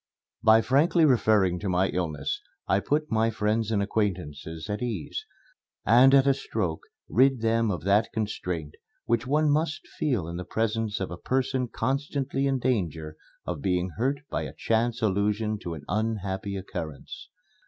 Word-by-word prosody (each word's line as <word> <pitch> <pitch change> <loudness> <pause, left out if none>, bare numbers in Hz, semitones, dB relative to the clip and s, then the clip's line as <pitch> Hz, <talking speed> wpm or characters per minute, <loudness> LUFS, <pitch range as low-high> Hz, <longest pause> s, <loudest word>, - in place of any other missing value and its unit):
By 110 +1 +6
frankly 155 +5 +4
referring 110 -9 +3
to 100 - -3
my 90 +1 +2
illness, 80 -6 -2 0.3
I 95 - +3
put 150 +6 -1
my 115 0 +3
friends 110 0 0
and 105 -3 +1
acquaintances 80 -6 -3
at 105 0 -3
ease, 115 -9 -4 0.6
and 130 +5 +7
at 135 -1 +6
a 140 - +5
stroke 100 -11 -3 0.3
rid 130 0 +3
them 115 0 +2
of 90 -4 -3
that 100 +4 +3
constraint 90 -8 -3 0.3
which 115 +1 0
one 150 +2 +3
must 155 +1 0
feel 120 - -1
in 85 +1 -5
the 90 - -4
presence 110 +1 -1
of 95 - -3
a 85 - -5
person 130 +3 0
constantly 135 +1 -1
in 135 -1 +1
danger 85 - -1 0.3
of 85 -5 -4
being 90 +1 0
hurt 135 +4 0
by - - -1
a - - -6
chance 115 +1 0
allusion 105 +1 +1
to 85 -3 -5
an 75 - -10
unhappy 105 -2 -2
occurrence. 80 -5 -7
110 Hz, 160 wpm, -27 LUFS, 95-130 Hz, 0.6 s, and